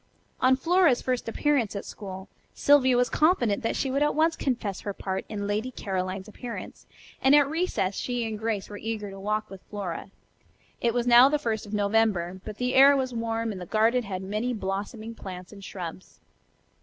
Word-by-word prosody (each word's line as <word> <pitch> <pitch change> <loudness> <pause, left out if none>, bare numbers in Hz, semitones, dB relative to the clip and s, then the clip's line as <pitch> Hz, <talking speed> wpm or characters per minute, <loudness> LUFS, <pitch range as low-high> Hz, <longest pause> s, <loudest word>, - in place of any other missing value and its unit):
On 260 +1 +5
Flora's 330 -1 +3
first 250 -3 -1
appearance 255 -4 +1
at 200 - -4
school 190 -1 -8 0.3
Sylvia 260 -3 +5
was 245 0 +3
confident 265 - +2
that 230 - -1
she 265 - -1
would 275 +2 0
at 295 - +2
once 320 +1 +3
confess 230 -10 -2
her 200 - -4
part 190 -1 -3
in 205 -1 -4
"Lady 210 +4 -1
Caroline's" 190 -4 -4
appearance, 235 +2 -8 0.3
and 270 +2 +6
at 290 -1 +5
recess 315 - -1
she 245 -2 -2
and 215 -1 -5
Grace 220 -3 -2
were 205 -1 -8
eager 215 -2 -4
to 195 - -9
walk 210 +2 -2
with 190 -1 -10
Flora. 200 -3 -5 0.7
It 235 0 +1
was 240 -1 +1
now 245 +2 +8
the 300 - +2
first 220 -6 -3
of 205 - -9
November, 200 -4 +1
but 215 -1 -7
the 250 +1 -1
air 275 +1 +7
was 260 -2 -2
warm 230 -1 -2
and 190 -3 -7
the 180 - -7
garden 225 +5 +3
had 190 -4 -5
many 215 +6 -2
blossoming 210 +3 -4
plants 185 -4 -9
and 200 -1 -12
shrubs. 180 -2 -8
225 Hz, 195 wpm, -27 LUFS, 200-255 Hz, 0.7 s, now